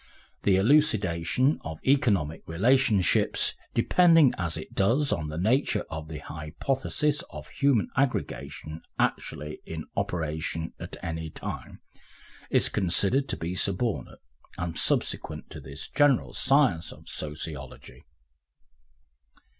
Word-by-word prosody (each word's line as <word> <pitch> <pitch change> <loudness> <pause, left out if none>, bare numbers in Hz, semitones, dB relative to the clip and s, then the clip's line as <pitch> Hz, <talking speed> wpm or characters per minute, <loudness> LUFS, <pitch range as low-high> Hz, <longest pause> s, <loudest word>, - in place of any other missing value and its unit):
The 100 - +3
elucidation 110 - +3
of 80 -1 -6
economic 100 - +2
relationships, 105 +2 +3 0.2
depending 165 -6 +5
as 85 -4 -2
it - - -8
does 125 +9 +2
on 75 -2 -2
the 75 +1 -5
nature 115 - +1
of 80 0 -5
the 80 -1 -6
hypothesis 135 - -2
of - - -9
human 140 -7 +2
aggregation 125 - -2 0.2
actually 75 +1 -2
in 80 -1 -6
operation 80 0 -2
at - - -7
any 80 0 -4
time, - - -7 0.7
is - - +4
considered 100 +9 +2
to - - -1
be 85 +2 -3
subordinate 100 - -1 0.3
and 85 -1 -3
subsequent - - 0
to - - -7
this 70 +1 -7
general 145 -3 +3
science 135 - +2
of - - -14
Sociology. 75 -2 -7
95 Hz, 115 wpm, -27 LUFS, 80-135 Hz, 0.7 s, depending